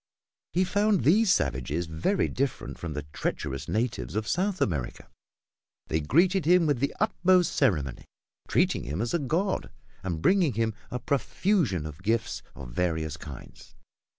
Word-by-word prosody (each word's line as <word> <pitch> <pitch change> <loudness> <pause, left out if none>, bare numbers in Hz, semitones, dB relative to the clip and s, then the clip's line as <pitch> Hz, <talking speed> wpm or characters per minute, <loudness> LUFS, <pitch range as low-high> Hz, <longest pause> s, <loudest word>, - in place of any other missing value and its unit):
He 180 - +3
found 205 - +2
these 195 - +5
savages 70 - 0
very 80 - 0
different 135 -1 -3
from 85 -3 -4
the 75 0 -4
treacherous 65 0 -3
natives 105 - -2
of 110 0 -1
South 190 +1 0
America. 70 -10 -2 0.8
They 80 - +1
greeted 175 - +3
him 175 +1 +5
with 145 -5 +1
the 140 - -1
utmost 185 -4 +3
ceremony, 75 - +1 0.4
treating - - +1
him 75 +7 -3
as 115 +2 -1
a 170 - +2
god 165 +8 -1 0.3
and 90 -4 -3
bringing 175 - +3
him 110 0 0 0.2
a 125 - -3
profusion 140 - 0
of 75 +2 -8
gifts 110 +3 -1
of 65 -3 -9
various 80 0 -1
kinds. 75 -5 -11
115 Hz, 150 wpm, -27 LUFS, -, 0.8 s, these